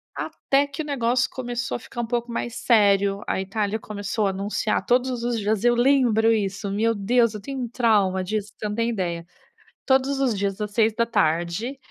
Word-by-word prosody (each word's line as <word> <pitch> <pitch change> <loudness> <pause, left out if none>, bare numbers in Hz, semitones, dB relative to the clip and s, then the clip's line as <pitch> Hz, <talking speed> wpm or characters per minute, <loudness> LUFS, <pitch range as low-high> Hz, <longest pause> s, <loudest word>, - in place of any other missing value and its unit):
Até 280 +1 0
que 315 +3 -5
o - - -9
negócio 245 -4 +1
começou 245 -1 -3
a - - -6
ficar 240 +1 -6
um - - -3
pouco 240 0 -2
mais 235 0 -4
sério, 200 -3 +3
a - - -1
Itália 205 +2 -2
começou 210 0 -3
a - - +2
anunciar 200 +3 -1
todos 250 -1 +1
os 240 -1 0
dias 215 +1 -1
eu 240 0 +5
lembro 240 -3 +3
isso, 200 -2 -1
meu 225 +3 +1
Deus, 230 +3 +2
eu 210 - -7
tenho 270 +5 -6
um 240 - -3
trauma 205 -6 +2
disso, 210 +2 -3
você 210 - -3
não 210 - -3
tem 230 +1 0
ideia. 170 -5 -3 0.6
Todos 270 +1 +2
os 250 -6 +1
dias 195 0 -2
às 210 0 -3
18h, 215 - 0
225 Hz, 190 wpm, -24 LUFS, 200-240 Hz, 0.6 s, eu